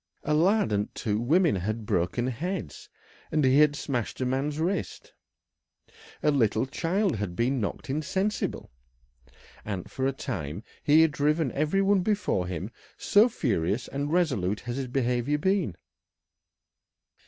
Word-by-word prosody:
A 150 - 0
lad 190 - +3
and 105 0 0
two 105 -3 -1
women 155 - +3
had 110 +4 -3
broken 90 +7 0
heads, 130 - -4 0.4
and 150 -2 +2
he 130 +2 +5
had 150 -1 +5
smashed 125 -6 -3
a 130 - 0
man's 140 +4 -1
wrist; 180 +3 -3 1.1
a 150 - +4
little 115 -4 +2
child 170 - 0
had 100 -4 -4
been 125 +3 0
knocked 100 - -4
insensible, 190 - -2 0.9
and 95 -4 -5
for 130 0 -1
a - - +1
time 100 - -5 0.2
he 150 +2 +6
had 160 - +3
driven 150 0 +1
every 155 +7 +1
one 195 -1 +3
before 190 - 0
him, 90 -4 -5 0.3
so 215 +4 +4
furious 110 - -1
and 145 +2 -3
resolute 130 - +1
had 120 - -5
his 135 0 -3
behaviour 125 +2 0
been. 185 - 0
135 Hz, 140 wpm, -27 LUFS, 110-160 Hz, 1.1 s, he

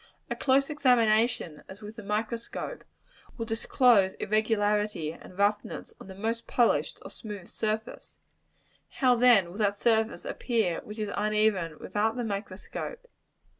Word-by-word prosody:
A - - 0
close 275 +2 +2
examination, 230 - +2
as 200 +3 -11
with 210 +1 -8
the 225 - -8
microscope, 225 - -4 0.5
will 230 - -3
disclose 225 -3 +3
irregularity 210 -5 0
and 180 +2 -14
roughness 205 +1 -1
on - - -11
the 190 - -9
most 225 +4 -3
polished 240 -2 +2
or - - -9
smooth 205 -5 -8
surface: 220 +1 -4 0.7
how 255 -3 +3
then 230 -8 +5
will 200 - -9
that 205 -1 +1
surface 225 -1 +1
appear 220 -9 0
which 210 - -10
is 210 -2 -3
uneven 210 -6 +1
without 220 +2 -1
the 245 - -1
microscope? 205 - -5
215 Hz, 135 wpm, -28 LUFS, 200-230 Hz, 0.7 s, then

